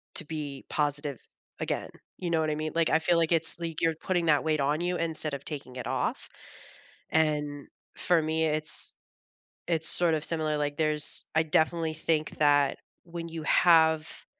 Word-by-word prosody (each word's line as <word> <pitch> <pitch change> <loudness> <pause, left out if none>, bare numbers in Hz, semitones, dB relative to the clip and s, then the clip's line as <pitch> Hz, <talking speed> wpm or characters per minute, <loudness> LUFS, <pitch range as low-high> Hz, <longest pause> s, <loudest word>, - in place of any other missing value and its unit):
to 175 - 0
be 145 -3 -6
positive 145 -2 -1 0.4
again; - - -2 0.3
you 175 - -3
know 165 -1 +2
what 155 -1 0
I - - -1
mean? 155 0 -4
Like, 165 -1 +2
I 160 - +4
feel 170 +1 +2
like 165 0 +1
it's 165 0 +1
like, 165 -2 -4
you're 165 -1 +2
putting 175 -3 0
that 150 -2 +4
weight 155 -1 +1
on 145 +3 +1
you 180 +1 0
instead 160 -3 0
of 140 - -5
taking 140 -4 -7
it 125 - -5
off, - - -2 0.8
and 150 -2 0 0.3
for 175 -2 +2
me, 160 +1 0
it's 155 0 -2 0.8
it's 165 -2 +1
sort 175 -2 +4
of 155 - -1
similar. 155 -2 0
Like, 145 -1 -2
there's 155 -1 0
I 160 - +4
definitely 160 +1 +1
think 155 0 -1
that 145 -2 +4 0.3
when 170 -1 -7
you 165 -1 -6
have, 160 -2 +3
155 Hz, 180 wpm, -28 LUFS, 150-165 Hz, 0.8 s, I